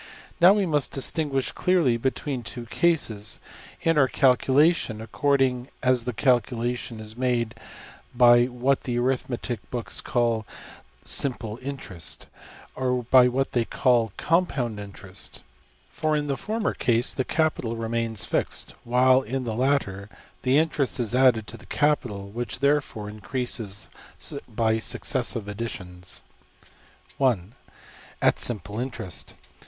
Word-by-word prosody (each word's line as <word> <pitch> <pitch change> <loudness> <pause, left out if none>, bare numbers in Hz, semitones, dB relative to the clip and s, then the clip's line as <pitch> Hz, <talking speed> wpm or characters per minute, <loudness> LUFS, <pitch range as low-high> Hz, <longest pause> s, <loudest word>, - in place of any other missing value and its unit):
Now 180 +3 +8
we 205 -2 +1
must 150 -5 0
distinguish 135 -1 0
clearly 175 -10 +2
between 130 +2 -2
two 120 +1 -7
cases, 115 -8 0 0.4
in 165 -2 +3
our 135 - +5
calculation, 130 0 +3
according 130 +1 +1 0.2
as 125 -2 +2
the 125 - -1
calculation 120 -1 0
is 110 0 -7
made 120 -2 0 0.6
by 120 0 +7
what 125 +2 0
the 120 -2 -2
arithmetic 125 -1 -1
books 120 -2 -3
call 115 -3 0 0.6
``simple 120 -4 0
interest,'' 130 - -6 0.5
or 125 -1 -1
by 130 -1 +8
what 135 +2 0
they 120 - +2
call 120 -2 +2
``compound 135 - 0
interest.'' 100 -2 -8 0.4
For 155 -1 -1
in 150 - -1
the 140 -1 -1
former 215 +7 -2
case 120 0 +1
the 130 - -1
capital 150 -7 0
remains 115 -1 -2
fixed, - - -2
while 130 +2 +4
in 130 +2 -3
the 115 -2 -3
latter 110 -6 0 0.3
the 130 +2 +3
interest 150 -4 +1
is 120 -2 0
added 125 -4 +4
to 90 - -8
the - - -16
capital, 120 -10 0
which 110 +1 -5
therefore 140 -6 0
increases 105 -1 -3 0.6
by 110 -1 +1
successive 115 -1 -1
additions. 95 -4 -5 1.0
\Paragraph{{\upshape(1)}~At 120 -4 -2
simple 105 -2 -1
interest. 110 - -4
125 Hz, 125 wpm, -25 LUFS, 115-135 Hz, 1.0 s, Now